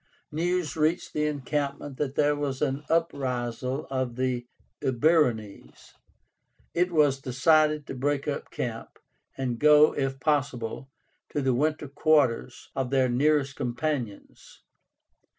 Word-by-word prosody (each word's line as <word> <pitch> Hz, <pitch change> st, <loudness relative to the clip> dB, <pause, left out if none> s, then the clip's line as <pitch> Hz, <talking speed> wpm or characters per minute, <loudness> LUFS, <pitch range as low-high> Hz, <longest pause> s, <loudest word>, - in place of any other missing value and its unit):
News 175 Hz, +1 st, -1 dB
reached 160 Hz, +3 st, 0 dB
the 150 Hz, 0 st, +1 dB
encampment 145 Hz, -1 st, -3 dB
that 140 Hz, -2 st, -2 dB
there 145 Hz, 0 st, +3 dB
was 140 Hz, -2 st, -3 dB
an 140 Hz, -1 st, -1 dB
uprisal 130 Hz, -4 st, -1 dB
of 130 Hz, -3 st, -2 dB
the 125 Hz, -1 st, -1 dB, 0.3 s
Eburónes. 125 Hz, -6 st, 0 dB, 0.8 s
It 180 Hz, +1 st, +1 dB
was 145 Hz, -4 st, +3 dB
decided 150 Hz, +3 st, +3 dB
to -, -, -6 dB
break 140 Hz, +2 st, -1 dB
up 145 Hz, -, -3 dB
camp, 115 Hz, -2 st, -5 dB, 0.4 s
and 125 Hz, -3 st, -2 dB
go, 150 Hz, 0 st, +6 dB
if 135 Hz, -1 st, -2 dB
possible, 135 Hz, -4 st, -1 dB, 0.4 s
to 150 Hz, -, -2 dB
the 130 Hz, -1 st, +2 dB
winter 150 Hz, +3 st, 0 dB
quarters 140 Hz, -3 st, +1 dB
of 130 Hz, -2 st, -1 dB
their 130 Hz, -1 st, +2 dB
nearest 140 Hz, +2 st, +2 dB
companions. 125 Hz, -3 st, -4 dB
140 Hz, 120 wpm, -27 LUFS, 130-150 Hz, 0.8 s, go